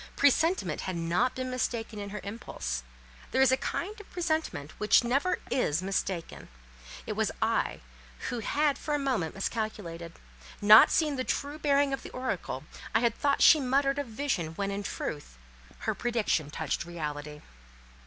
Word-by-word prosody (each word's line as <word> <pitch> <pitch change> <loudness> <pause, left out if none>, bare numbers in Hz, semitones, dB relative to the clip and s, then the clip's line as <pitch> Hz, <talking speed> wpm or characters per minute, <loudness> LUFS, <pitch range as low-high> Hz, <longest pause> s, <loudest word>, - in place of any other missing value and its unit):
Presentiment 285 - +2
had 185 -2 -3
not 170 +9 +1
been 255 0 -3
mistaken 230 -3 -2
in 200 0 -5
her 210 0 -6
impulse: 185 - -4 0.5
there 260 - 0
is 265 - +5
a - - +5
kind 415 - -4
of 415 - -17
presentiment 315 - -2
which 210 +3 +5
never 275 +10 +1
is 175 - +1
mistaken; 190 -3 -3 0.6
it - - -3
was - - 0
I - - 0 0.5
who 245 - -2
had 290 +6 +1
for 300 - -1
a - - +2
moment 255 - -1
miscalculated; 195 -5 -4 0.5
not 210 +2 +9
seeing 300 -4 +1
the 255 - 0
true 285 +3 -2
bearing 285 -2 +3
of 270 - -2
the - - -9
oracle, 200 - -3 0.3
I 225 - +5
had 235 -2 +3
thought 280 +3 +1
she 315 - +8
muttered 275 +1 +1
of 285 - -3
vision 215 - -2
when, 200 +1 -2
in 200 +1 -3
truth, 145 - -5 0.4
her - - 0
prediction 230 -11 0
touched 155 -1 -2
reality. 150 -3 -6
225 Hz, 165 wpm, -29 LUFS, 170-280 Hz, 0.6 s, not